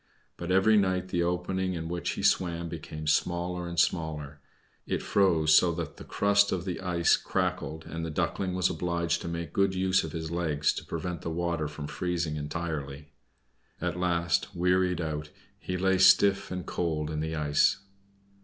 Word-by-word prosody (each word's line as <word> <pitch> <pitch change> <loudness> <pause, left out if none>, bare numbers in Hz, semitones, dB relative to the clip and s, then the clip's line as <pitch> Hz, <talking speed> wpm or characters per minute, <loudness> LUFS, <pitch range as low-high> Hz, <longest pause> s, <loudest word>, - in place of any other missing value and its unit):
But 85 - -6
every 95 +4 +5
night 95 -2 +1
the 85 - 0
opening 90 +2 -1
in 80 -1 -4
which 85 +1 -2
he - - -5
swam 85 -2 +1
became 75 -1 -7
smaller 85 +3 0
and 85 -1 -2
smaller. 75 -4 -1 0.5
It - - -2
froze 85 -6 +3
so 85 - +5
that 85 -3 -5
the - - -9
crust 100 0 +2
of 95 0 -2
ice 85 -2 +3
crackled 90 -4 -2
and 80 0 -5
the 80 - -3
Duckling 90 +4 -1
was 90 -2 +2
obliged 85 0 -1
to - - -6
make 85 0 -4
good 100 -1 +2
use 95 0 +2
of 80 - -5
his 80 0 -5
legs 80 -4 +1
to - - -6
prevent 85 0 -4
the - - -4
water 85 -1 -1
from 75 0 -7
freezing 85 -1 -2
entirely. 75 -2 -5 0.7
At 90 -1 -2
last, 85 +1 0
wearied 90 0 +2
out, 75 -2 -4 0.3
he 90 - -3
lay 95 0 +2
stiff 95 +1 +5
and 90 -1 -5
cold 80 -3 -2
in 75 - -3
the 80 +1 -2
ice. 75 -1 +3
85 Hz, 170 wpm, -28 LUFS, 80-90 Hz, 0.7 s, every